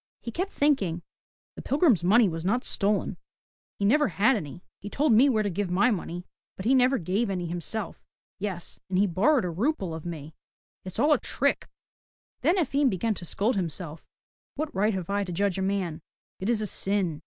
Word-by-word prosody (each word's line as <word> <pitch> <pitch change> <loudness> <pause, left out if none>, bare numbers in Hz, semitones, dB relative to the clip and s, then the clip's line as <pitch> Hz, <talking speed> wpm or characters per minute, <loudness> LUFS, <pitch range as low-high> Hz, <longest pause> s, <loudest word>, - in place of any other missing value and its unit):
He 235 - -6
kept 370 - -2
thinking, 200 - +1 0.5
The - - -7
pilgrim's 275 - +3
money 215 +5 +5
was 165 -2 -4
not 225 +7 +1
stolen. 205 0 0 0.6
He 200 - -1
never 295 +8 +4
had 215 +6 +3
any. 170 -2 -6 0.2
He 205 - -7
told 280 +2 +2
me 255 +6 +6
where 220 -4 +2
to 205 - -1
give 195 +1 -2
my 200 +8 +3
money, 175 -3 -4 0.3
but 190 - -7
he 250 - +4
never 260 +1 +4
gave 200 +5 -1
any 180 -2 -2
himself. 175 +6 -4 0.4
Yes, 185 -4 -5
and 185 - 0
he 200 - +4
borrowed 220 - +2
a 175 - -2
rouble 195 - -1
of 160 +1 -6
me. 155 -2 -7 0.5
It's 185 -1 -7
all 300 +1 +4
a - - +2
trick!'* - - -1 0.7
Then 355 - +3
Efim 285 -4 +2
began 215 +3 0
to 180 - -6
scold 215 +8 0
himself, 165 -3 -4 0.5
'*What 305 +1 -3
right 210 +2 +1
have 185 0 -4
I 200 0 +1
to 185 - -6
judge 195 +1 0
a - - -1
man? 190 -4 -2 0.4
It 190 - -2
is 230 -3 +2
a - - -1
sin. 190 -6 0
200 Hz, 200 wpm, -27 LUFS, 180-240 Hz, 0.7 s, me